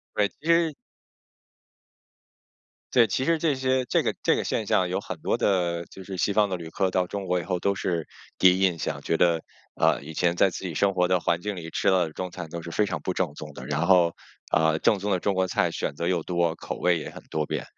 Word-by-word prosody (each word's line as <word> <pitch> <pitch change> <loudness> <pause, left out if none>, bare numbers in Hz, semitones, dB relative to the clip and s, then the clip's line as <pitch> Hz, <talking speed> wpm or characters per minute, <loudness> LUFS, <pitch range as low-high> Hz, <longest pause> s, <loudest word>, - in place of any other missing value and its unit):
对， 105 - +3
其 155 - -9
实 165 -1 +4 2.2
对， 120 -2 +6
其 115 +5 -1
实 165 +4 +2
这 155 -2 +1
些 130 -1 +1
这 - - +2
个 - - -1
这 - - +4
个 - - -1
现 110 - -1
象 95 -4 +2
有 90 - -1
很 - - -7
多 - - 0
的 85 -3 +1
就 95 - -10
是 95 0 -7
西 100 - +1
方 105 0 +3
的 90 - -2
旅 80 -2 -9
客 95 - +1
到 90 0 +1
中 100 +1 -5
国 90 0 +1
以 - - -5
后， 90 -1 -2
都 100 +2 0
是 85 -4 -2 0.3
第 95 -1 +6
一 - - -3
印 90 -4 +2
象 - - -3
觉 85 - 0
得， 85 -1 +2 0.3
呃， - - +2
以 75 +3 -9
前 85 +1 +1
在 95 +2 +4
自 95 - -7
己 90 - -4
生 100 +5 +1
活 90 -1 +3
的 90 0 +2
环 85 0 0
境 105 +2 -4
里 85 -3 -7
吃 - - -2
了 90 -3 +3
的 80 - -11
中 90 +1 -5
餐 85 -3 -7
都 85 +1 -6
是 85 - -7
非 105 +4 +1
常 - - -3
不 95 - -1
正 90 -5 -1
宗 - - -9
的。 - - -9
然 75 +3 0
后， 85 -2 +4 0.4
呃， 80 0 +3
正 105 - +3
宗 100 +2 -2
的 95 - +2
中 100 +2 0
国 95 0 +2
菜 - - +1
选 - - -3
择 85 +4 -3
又 90 -3 0
多， 85 -2 0
口 - - -6
味 90 -1 +3
也 75 - -6
很 - - -11
多 75 -1 -1
变， - - -3
90 Hz, 275 characters per minute, -26 LUFS, 85-100 Hz, 2.2 s, 对